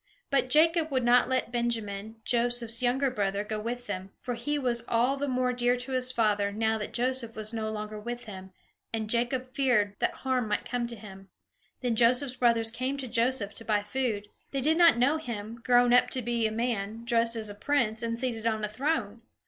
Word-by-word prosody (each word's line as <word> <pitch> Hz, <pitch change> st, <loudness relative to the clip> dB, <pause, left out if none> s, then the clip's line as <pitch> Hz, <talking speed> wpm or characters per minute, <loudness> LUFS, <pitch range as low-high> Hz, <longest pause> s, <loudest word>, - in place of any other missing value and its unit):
But 275 Hz, -2 st, +2 dB
Jacob 320 Hz, +3 st, +4 dB
would 260 Hz, -3 st, 0 dB
not 245 Hz, +1 st, +4 dB
let 255 Hz, -2 st, 0 dB
Benjamin, 225 Hz, -3 st, -2 dB
Joseph's 235 Hz, -1 st, +1 dB
younger 255 Hz, +2 st, +1 dB
brother, 200 Hz, -3 st, -1 dB
go 215 Hz, 0 st, -4 dB
with 240 Hz, +3 st, -4 dB
them, 190 Hz, -2 st, -5 dB
for 245 Hz, -, -4 dB
he 290 Hz, +6 st, -2 dB
was 245 Hz, -4 st, 0 dB
all 245 Hz, +4 st, +2 dB
the 285 Hz, +1 st, -3 dB
more 255 Hz, -1 st, 0 dB
dear 245 Hz, 0 st, +1 dB
to 250 Hz, +2 st, -3 dB
his 255 Hz, -1 st, 0 dB
father, 210 Hz, -4 st, +1 dB
now 220 Hz, +1 st, 0 dB
that 210 Hz, -, -5 dB
Joseph 245 Hz, -1 st, +1 dB
was 215 Hz, +1 st, -4 dB
no 220 Hz, -1 st, -2 dB
longer 215 Hz, 0 st, -5 dB
with 240 Hz, +2 st, -6 dB
him; 190 Hz, -3 st, -9 dB, 0.4 s
and 220 Hz, -1 st, -2 dB
Jacob 250 Hz, +2 st, 0 dB
feared 235 Hz, -6 st, +2 dB
that -, -, 0 dB
harm 255 Hz, -3 st, +1 dB
might 210 Hz, +3 st, -1 dB
come 245 Hz, 0 st, -2 dB
to 235 Hz, -, -5 dB
him. 195 Hz, -2 st, -12 dB, 0.5 s
Then 245 Hz, -3 st, 0 dB
Joseph's 250 Hz, +3 st, +3 dB
brothers 230 Hz, -2 st, +3 dB
came 255 Hz, +4 st, -2 dB
to 270 Hz, -2 st, -5 dB
Joseph 230 Hz, -3 st, +1 dB
to -, -, -6 dB
buy 210 Hz, -2 st, 0 dB
food. 210 Hz, -3 st, -2 dB, 0.2 s
They 275 Hz, -, -2 dB
did 315 Hz, +5 st, +2 dB
not 335 Hz, -6 st, +7 dB
know 275 Hz, +6 st, +3 dB
him, 230 Hz, -5 st, -6 dB
grown 245 Hz, -1 st, +4 dB
up 245 Hz, -, +5 dB
to 255 Hz, -, -1 dB
be 235 Hz, -1 st, 0 dB
a -, -, -4 dB
man, 225 Hz, -1 st, -3 dB
dressed 230 Hz, -1 st, +2 dB
as 215 Hz, -2 st, -2 dB
a -, -, -7 dB
prince, 225 Hz, 0 st, 0 dB
and 230 Hz, 0 st, -3 dB
seated 235 Hz, -3 st, -2 dB
on 220 Hz, -1 st, -1 dB
a -, -, -5 dB
throne. 235 Hz, -3 st, -2 dB
235 Hz, 210 wpm, -28 LUFS, 220-255 Hz, 0.5 s, not